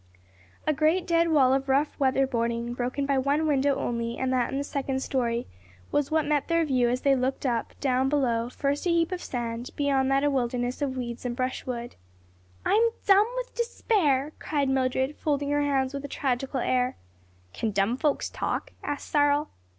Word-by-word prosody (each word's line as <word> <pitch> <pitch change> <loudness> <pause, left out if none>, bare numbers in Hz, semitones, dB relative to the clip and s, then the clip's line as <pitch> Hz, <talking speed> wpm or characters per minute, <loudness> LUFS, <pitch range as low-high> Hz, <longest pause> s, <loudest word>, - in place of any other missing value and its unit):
A 310 - +2
great 315 +5 +2
dead 335 -1 +3
wall 270 -5 +4
of 270 0 -1
rough 280 +3 +1
weather 270 0 +3
boarding 235 -1 -1
broken 250 +3 -2
by 275 -1 +2
one 285 +4 +1
window 280 -2 +2
only 235 0 -2
and 260 0 0
that 250 -2 +1
in 270 - -2
the 280 - -1
second 270 -2 -2
story, 240 -2 -1 0.5
was 290 -1 +1
what 315 -1 +1
met 290 -1 +1
their 335 -1 +2
view 255 -4 +2
as 250 +1 -1
they 275 -1 +4
looked 260 +2 -1
up; 235 -3 -2
down 265 -1 +1
below, 240 -5 +1
first 285 +5 -1
a - - +2
heap 335 +1 +2
of 365 -1 -3
sand, 240 0 -4
beyond 275 -2 +1
that 275 +1 +2
a 290 - +3
wilderness 245 0 -1
of 265 -2 -1
weeds 235 -1 -5
and 245 -1 -3
brushwood. 250 -1 -4 0.7
"I'm 430 - +4 0.2
dumb 405 +2 +6
with - - -4
despair!" 325 - +1
cried 285 -3 -1
Mildred, 265 +1 0
folding 285 -1 -1
her 290 0 +2
hands 275 -2 +1
with 280 0 -5
a - - -4
tragical 265 -1 -2
air. 250 0 +1 0.6
"Can 225 - -2
dumb 200 +3 +1
folks 295 +2 0
talk?" - - -3
asked 290 -1 -4
Cyril. 290 0 +2
270 Hz, 190 wpm, -27 LUFS, 250-290 Hz, 0.7 s, dumb